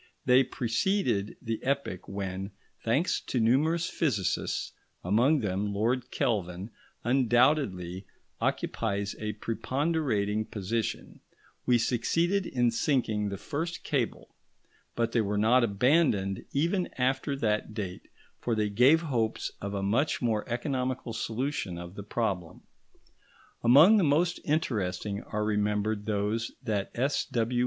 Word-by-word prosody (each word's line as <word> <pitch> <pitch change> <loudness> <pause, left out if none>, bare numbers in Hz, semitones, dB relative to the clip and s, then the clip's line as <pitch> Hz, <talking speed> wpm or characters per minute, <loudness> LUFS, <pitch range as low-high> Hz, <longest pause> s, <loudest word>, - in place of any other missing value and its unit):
They 125 +1 +6
preceded 120 - 0
the 115 -2 -2
epoch 135 -9 -2
when, 95 0 -4 0.3
thanks 135 +10 +1
to 125 - 0
numerous 155 +9 +2
physicists, 110 - -1 0.3
among 120 - +3
whom 100 +1 -1
Lord 120 +4 0
Kelvin 95 -4 -2 0.3
undoubtedly 120 - +2 0.3
occupies 100 -2 -1
a 105 0 -3
preponderating 115 -2 -1
position, 110 +3 -3 0.5
we 125 -1 +5
succeeded 165 - +1
in 120 -2 +2
sinking 115 -5 0
the 100 - -4
first 165 - -4
cable; 130 -6 -2 0.6
but 115 -1 0
they 115 - +2
were 105 -1 -1
not 120 +4 +4
abandoned, 105 - +2
even 170 +6 0
after 135 +2 0
that 110 -3 -1
date, 95 -5 -5 0.3
for 120 - -1
they 105 -1 0
gave 130 +10 +5
hopes 120 -9 -1
of 100 0 -4
a 100 - -2
much 120 +10 +1
more 115 -2 -1
economical 125 -1 -2
solution 115 -4 -2
of 85 0 -8
the 100 - -7
problem. 100 -5 -3 1.0
Among 145 - +8
the 200 - +3
most 165 +4 +2
interesting 105 - -1
are 105 0 -3
remembered 105 0 0
those 105 +2 -1
that 105 -5 -1
S.W. 120 -2 0
115 Hz, 120 wpm, -29 LUFS, 105-135 Hz, 1.0 s, Among